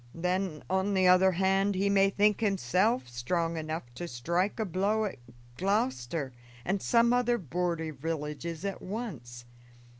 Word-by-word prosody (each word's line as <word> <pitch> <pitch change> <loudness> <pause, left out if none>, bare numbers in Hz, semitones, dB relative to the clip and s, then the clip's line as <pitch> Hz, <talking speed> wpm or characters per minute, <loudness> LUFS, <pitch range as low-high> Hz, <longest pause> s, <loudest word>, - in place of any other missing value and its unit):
Then, 180 -1 -2
on 190 +2 0
the 185 -1 +4
other 185 +1 +6
hand, 195 +2 +2
he 195 +2 +1
may 195 -1 +4
think 205 +1 +2
himself 205 - +1
strong 165 +8 -2
enough 160 0 -3
to 175 +7 -6
strike 170 - -1
a 220 - 0
blow 200 +4 0
at 195 - -5 0.4
Gloucester 135 - -1 0.3
and 190 +1 0
some 235 0 +3
other 245 -1 +2
border 170 - -2
villages 155 +3 -4
at 195 -1 -4
once. 140 - -6
185 Hz, 145 wpm, -29 LUFS, 160-200 Hz, 0.4 s, other